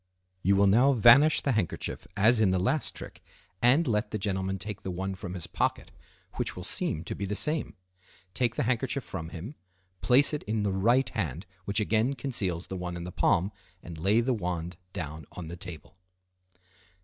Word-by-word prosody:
You 100 +2 +3
will 100 +1 +4
now 120 +8 +5
vanish 130 +6 +6
the 140 - 0
handkerchief 105 -8 -2
as 110 +4 +5
in 105 -3 +4
the 95 - +2
last 105 +12 0
trick, - - -9 0.4
and 135 +8 +5
let 105 -2 0
the 110 - -2
gentleman 95 -1 -2
take 100 +2 -5
the - - -5
one 95 +2 -3
from 95 -1 -7
his 90 - -5
pocket, - - -2 0.5
which - - -2
will - - -7
seem 80 +1 -1
to - - -5
be 100 - -4
the 105 +1 -3
same. 150 +7 0 0.6
Take 120 +1 0
the - - 0
handkerchief 130 +2 -1
from 80 -6 -6
him, 90 - -7 0.5
place 135 +5 +4
it 150 - -2
in 110 0 -1
the 100 -2 0
right 120 +8 +3
hand, 85 - -3 0.2
which 100 +1 +1
again 110 +5 +1
conceals 100 -10 -1
the 95 - -6
one 90 -1 -4
in 85 - -6
the 90 - -6
palm, 95 +3 +2 0.3
and 85 -2 -9
lay 100 +7 +3
the 125 +2 +1
wand 90 -4 -3 0.2
down 80 -2 -6
on 85 -3 -7
the 85 - -6
table. 85 -3 -8
100 Hz, 195 wpm, -28 LUFS, 90-120 Hz, 0.6 s, vanish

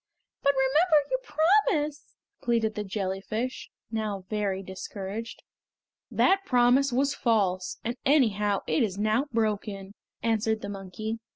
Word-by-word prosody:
"But 280 - +3
remember 290 +3 +3
your - - +1 0.6
promise!" 295 0 -5 0.3
pleaded 230 -2 +1
the 210 - -3
jellyfish, 200 +5 -3 0.2
now 210 -4 -3
very 200 -2 -1
discouraged. 195 +4 -6 0.7
"That 390 0 +3
promise 255 -2 +4
was 275 +3 +1
false, 195 -6 0
and 235 +1 -2
anyhow 210 -8 +3
it - - +1
is 200 -5 0
now 215 +6 +1
broken!" 205 -3 -2 0.3
answered 220 -1 +1
the 200 - -5
monkey. 205 +3 -5
220 Hz, 120 wpm, -27 LUFS, 200-255 Hz, 0.7 s, promise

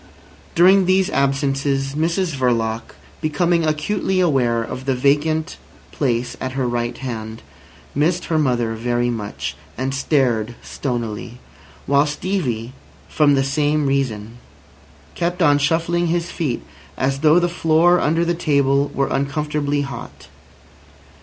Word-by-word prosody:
During 190 +2 +6
these 190 +1 +3
absences 135 0 0
Mrs 165 +3 0
Verloc, 115 -3 -1 0.3
becoming 165 +2 +1
acutely 185 +5 0
aware 125 -9 +2
of 130 +3 -7
the 135 -1 +1
vacant 150 +5 +1 0.3
place 125 -3 -1
at 130 0 -3
her 130 -2 -1
right 120 0 -2
hand, 110 -4 -6 0.5
missed 170 +5 +1
her 160 -2 0
mother 120 -5 +1
very 120 +1 0
much, 105 -3 -5 0.2
and 130 +1 -2
stared 125 -5 +1
stonily; 120 -2 -4 0.5
while 140 +2 +3
Stevie, 145 - -2 0.3
from 145 -2 +3
the 135 - +2
same 145 +2 +1
reason, 120 -5 -2 0.7
kept 175 +1 -2
on 145 -2 +5
shuffling 165 +3 +1
his 170 +1 -1
feet, 140 -8 -2 0.3
as 135 +1 0
though 155 +2 +5
the 175 0 +3
floor 170 +1 +3
under 165 +2 +1
the 170 - +1
table 140 -3 +2
were 135 - +2
uncomfortably 145 +1 -1
hot. 140 -1 -7
140 Hz, 125 wpm, -20 LUFS, 125-160 Hz, 0.7 s, During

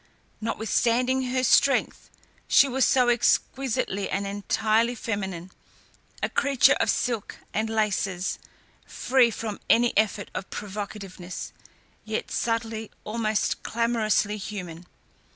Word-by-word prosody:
Notwithstanding 235 +4 +1
her 255 0 0
strength, 275 +2 +3 0.4
she 280 - +6
was 265 -1 +2
so 250 -2 +3
exquisitely 240 -3 +1
and 200 +1 -1
entirely 215 +4 +1
feminine, 190 -6 -4 0.7
a - - +3
creature 280 -2 +4
of - - +1
silk 235 -5 -1 0.2
and 220 +1 -1
laces, 200 -4 -1 0.5
free 250 -2 +3
from 220 -2 -5
any 235 +1 +4
effort 210 -1 +1
of 185 - -5
provocativeness, 200 -3 -6 0.5
yet 220 0 -4
subtly, 225 -1 -2
almost 215 -1 -1
clamorously 220 -3 0
human. 180 -4 -7
220 Hz, 105 wpm, -26 LUFS, 200-240 Hz, 0.7 s, she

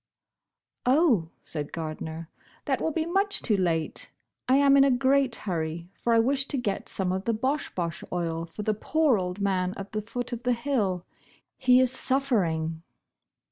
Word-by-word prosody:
"Oh," 250 - +3
said 150 -2 -5
Gardner, 160 0 -5 0.4
"that - - 0
will 320 - 0
be 315 +1 -1
much 390 +4 +1
too 215 - +2
late. 165 -4 -1 0.4
I 260 - +6
am 280 0 +5
in 275 - +7
a 275 - +4
great 265 -1 +2
hurry, 170 -2 -4
for 235 -1 0
I - - +5
wish 270 +4 +2
to 280 - -1
get 210 -6 -2
some 185 -2 -1
of 190 +1 -2
the 230 - +1
Bosh 265 +7 -1
Bosh 170 -2 -3
Oil 165 -1 -2
for 170 +6 -7
the 215 - +1
poor 285 +2 +2
old 180 +1 -4
man 185 -2 0
at 195 0 -7
the 215 -1 -2
foot 245 +3 -5
of 240 - -4
the 250 0 +1
hill. 230 -8 -1 0.5
He 255 -1 +5
is 255 -1 +3
suffering." 190 -13 +1
215 Hz, 180 wpm, -27 LUFS, 175-265 Hz, 0.5 s, in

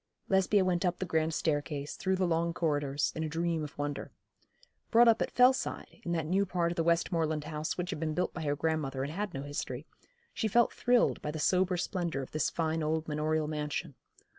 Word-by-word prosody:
Lesbia 190 0 +3
went 180 -1 +1
up 180 -1 +1
the 185 - -3
grand 160 -1 +1
staircase, 145 -2 -2
through 190 0 0
the 185 0 +1
long 170 0 0
corridors, 145 -4 0
in 160 - -2
a 155 - -2
dream 165 0 -1
of 150 - -8
wonder. 145 0 -3 0.8
Brought 235 +1 +6
up 230 0 +5
at - - +1
Fellside, 250 +1 +2
in 170 - -4
that 165 -2 -1
new 190 +5 +2
part 175 -3 0
of - - -4
the 165 - +1
Westmoreland 165 -2 +1
house 155 0 -3
which 180 -1 -2
had - - -4
been 155 -1 -2
built 180 - 0
by 170 - -5
her 145 -2 0
grandmother 145 -4 -1
and 145 +2 -4
had 205 +2 -3
no 135 - -4
history, 145 -1 -4 0.5
she 220 - 0
felt 235 +3 +3
thrilled 245 -1 +2
by - - -3
the 155 - -4
sober 180 +3 +2
splendour 170 -6 -2
of - - -10
this 155 - 0
fine 160 0 -1
old 155 +1 -1
manorial 155 0 0
mansion. 150 -2 -3
160 Hz, 215 wpm, -31 LUFS, 150-180 Hz, 0.8 s, Brought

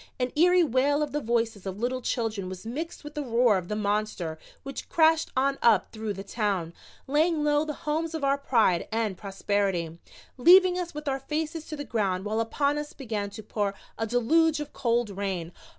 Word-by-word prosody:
An 250 0 0
eerie 355 +3 +5
wail 285 +1 +2
of 295 - -4
the 295 - -2
voices 225 -4 -1
of 190 0 -4
little 250 +3 -1
children 220 -6 -2
was 185 +2 -8
mixed 305 +9 -5
with 295 0 -9
the 300 - -3
roar 235 -5 +3
of 175 - -9
the 210 - -2
monster 205 -6 -2 0.2
which 275 0 -7
crashed 320 0 +4
on 275 +1 +1
up 225 -5 +4
through 220 -1 -4
the 195 0 -7
Town, 200 -5 -2 0.3
laying 305 +3 +2
low 295 0 +2
the 300 -2 -4
homes 320 +2 -1
of 315 - -4
our 275 0 +2
pride 230 -10 +2
and 220 -3 -1
prosperity, 195 -4 -2 0.4
leaving 360 +6 +6
us 345 -3 -5
with 300 0 -6
our 270 -1 0
faces 310 +3 -3
to 310 - -5
the 290 - -4
ground 195 -4 -1
while 215 +2 -1
upon 285 +6 0
us 295 0 -6
began 215 -6 -4
to 215 +2 -9
pour 205 -1 -2 0.2
a 225 - -2
deluge 305 +7 +3
of 295 0 -6
cold 235 -3 0
rain. 190 -4 -3
240 Hz, 200 wpm, -27 LUFS, 205-295 Hz, 0.4 s, leaving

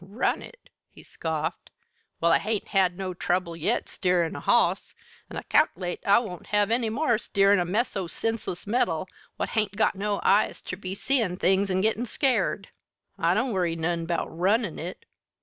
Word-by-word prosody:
"Run 200 +6 -1
it!" - - -14 0.2
he - - -16
scoffed. 160 0 -4 0.5
"Well, 170 0 +3
I - - +5
hain't 215 0 -3
had 185 -2 +2
no 190 -1 -3
trouble 175 -1 -1
yet 165 - 0
steerin' 175 -3 0
a - - -5
hoss, - - +2 0.3
an' - - -7
I - - -5
cal'late 175 0 +1
I 200 +2 +5
won't 200 -7 -4
have 210 0 +2
any 230 -1 +1
more 235 -1 +1
steerin' 200 -1 +3
a 175 - +1
mess 215 +8 -1
o' 190 -3 -2
senseless 225 -2 -3
metal 190 -7 0 0.3
what - - -2
hain't 210 -3 -1
got 220 - +2
no 205 0 -2
eyes 205 +2 +3
ter - - -5
be 185 0 -6
seein' 225 -6 0
things 195 +2 +2
an' 190 0 +1
gittin' 225 +3 +1
scared! 225 -6 0 0.5
I 170 +2 +3
don't 245 +2 0
worry 175 -3 0
none 165 0 -2
'bout 170 -1 -2
runnin' 195 +2 +1
it." 175 +3 -7
195 Hz, 185 wpm, -26 LUFS, 175-220 Hz, 0.5 s, I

